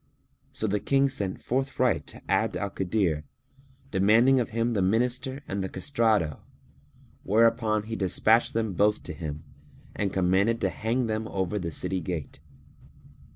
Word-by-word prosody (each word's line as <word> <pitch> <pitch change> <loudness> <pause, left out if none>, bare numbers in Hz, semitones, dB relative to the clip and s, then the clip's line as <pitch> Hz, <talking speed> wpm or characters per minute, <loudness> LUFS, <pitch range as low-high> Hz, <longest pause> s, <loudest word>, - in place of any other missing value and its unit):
So - - -3
the 105 0 0
King 140 +5 +2
sent 100 -8 -3
forthright 130 -1 0
to - - -3
Abd - - +1
al 100 -1 -3
Kadir, 90 -6 0 0.7
demanding 110 +7 +4
of 120 - -1
him 115 +1 0
the 105 -4 0
Minister 125 +7 0
and 100 0 -2
the 95 - -3
castrato, 110 - 0 0.8
whereupon 110 0 +2
he 110 +1 -5
despatched 110 +5 +2
them 110 -3 0
both 105 +3 +2
to 90 - -6
him 75 -1 -6 0.5
and 100 - 0
he - - -13
commanded 95 +5 +2
to - - +2
hang 120 +3 -1
them 110 0 -2
over 95 +1 -2
the 85 -3 -4
city 95 +4 -2
gate. 80 -5 -5
105 Hz, 155 wpm, -27 LUFS, 95-115 Hz, 0.8 s, demanding